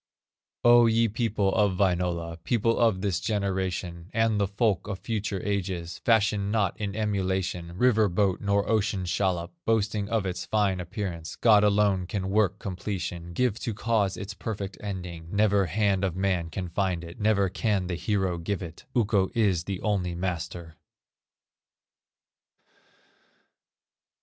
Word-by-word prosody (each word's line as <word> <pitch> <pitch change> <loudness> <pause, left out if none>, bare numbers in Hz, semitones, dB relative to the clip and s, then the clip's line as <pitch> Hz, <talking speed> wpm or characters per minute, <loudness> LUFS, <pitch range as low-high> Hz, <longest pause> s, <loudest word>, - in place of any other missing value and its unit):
O, 120 0 +7
ye 115 +1 +3
people 105 -3 0
of 105 -4 +2
Wainola, 85 -3 0
People 115 +2 +1
of 110 -6 +3
this 95 -4 0
generation, 95 -4 -2
And 115 -2 +2
the 100 - +2
folk 100 -2 0
of 100 -2 -3
future 105 -2 -3
ages, 90 -4 -3
Fashion 105 -3 +2
not 105 -4 +1
in 100 -1 -3
emulation, 95 -4 -2
River 110 -3 +4
boat, 95 +1 +1
nor 100 0 +1
ocean 105 -3 0
shallop, 85 0 -1
Boasting 105 -2 0
of 110 -3 0
its 90 -2 -3
fine 100 0 +1
appearance; 90 -2 -5
God 105 -3 +5
alone 100 -3 +2
can 95 -2 -3
work 105 -3 +2
completion, 90 -3 -5
Give 120 +2 0
to 115 - -3
cause 105 -2 0
its 100 +1 -6
perfect 105 -2 -5
ending, 90 -5 -6
Never 100 -2 +3
hand 100 +2 +1
of 95 -3 0
man 95 -3 0
can 90 +2 -4
find 90 -1 -1
it, 85 +5 -10
Never 105 -2 +3
can 100 0 0
the 90 - -3
hero 90 0 -1
give 95 +2 -3
it, 80 -2 -10
Ukko 105 -5 +2
is 95 -7 +2
the 95 -2 -3
only 95 -5 -1
Master." 85 -2 -4
100 Hz, 145 wpm, -27 LUFS, 90-105 Hz, -, O